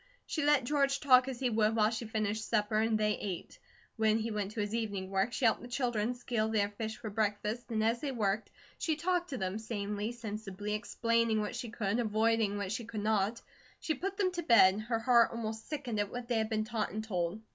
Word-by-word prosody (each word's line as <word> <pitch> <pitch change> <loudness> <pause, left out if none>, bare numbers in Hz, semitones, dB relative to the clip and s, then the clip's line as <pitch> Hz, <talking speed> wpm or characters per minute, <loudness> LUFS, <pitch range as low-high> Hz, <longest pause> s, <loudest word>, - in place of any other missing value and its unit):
She 310 - -2
let 290 -2 +4
George 275 +1 +1
talk 255 -2 +6
as 260 -3 -4
he 250 -2 +1
would 220 0 +2
while 215 -1 +3
she 230 0 -3
finished 220 0 -2
supper 215 -1 +1
and 220 0 +2
they 210 0 +1
ate. 185 -4 -5 0.4
When 220 -1 +3
he 225 +1 -2
went 205 -2 -2
for 215 -1 -3
his 205 +1 -3
evening 200 -5 -2
work, 195 +4 +1
she 250 - -1
helped 225 - +3
the 245 - -8
children 240 -2 -1
scale 235 -3 -1
their 205 -2 +1
fish 220 +1 -5
for 215 - -6
breakfast 210 +3 -1
and 220 -2 0
as 230 +2 +1
they 285 - -2
worked 215 -3 -1 0.3
she 315 - 0
talked 350 +2 0
to 270 - -3
them, 190 0 -2
sanely, 210 -1 -3
sensibly, 210 -3 -5
explaining 230 +1 +1
what 210 +2 -3
she 240 -1 -4
could, 215 +1 -1
avoiding 220 -2 +2
what 200 -2 -3
she 230 +2 -2
could 215 -2 -5
not. 215 +1 +1 0.4
She 315 - -1
put 385 +7 -4
them 385 -3 +2
to 350 -1 -3
bed, 210 - +6
her 230 +1 -1
heart 235 0 +5
almost 220 -1 -5
sickened 270 -8 -3
at 205 -1 0
what 245 -1 -5
they 235 -2 +1
had 220 0 -1
been 215 -1 0
taught 220 -1 -2
and 215 +1 -4
told. 180 -2 -2
220 Hz, 225 wpm, -32 LUFS, 210-240 Hz, 0.4 s, talk